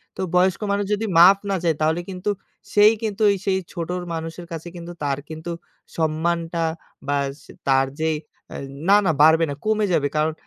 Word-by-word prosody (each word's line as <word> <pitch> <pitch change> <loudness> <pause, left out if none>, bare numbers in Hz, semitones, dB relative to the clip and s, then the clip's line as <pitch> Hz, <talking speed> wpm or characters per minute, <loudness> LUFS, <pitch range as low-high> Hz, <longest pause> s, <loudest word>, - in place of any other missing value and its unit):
তো - - -5
বয়স্ক 180 +2 +3
মানুষ 200 0 0
যদি 210 +2 -1
মাফ 190 +3 +8
না 195 - +1
চায়, 165 -2 +2
তাহলে 160 +2 +1
কিন্তু 185 +2 -3 0.4
সেই 210 +1 +7
কিন্তু 215 -1 -3
ওই 200 - +3
সেই 190 -1 +2
ছোট 180 +1 -3
মানুষের 165 +2 -5
কাছে 165 +1 -6
কিন্তু 170 0 -8
তার 140 -1 -1
কিন্তু 160 +2 -6 0.5
সম্মানটা 165 +1 0 0.4
বাস 140 -1 -1 0.3
তার 135 0 +4
যেই 160 -1 +1 0.3
অ্যা - - -7 0.3
না, 200 - +8
না 170 - +4
বাড়বে 160 +2 +6
না 140 - -3
কমে 215 0 +2
যাবে। 150 -4 +2
কারণ 155 +1 +1
170 Hz, 180 wpm, -22 LUFS, 160-190 Hz, 0.5 s, মাফ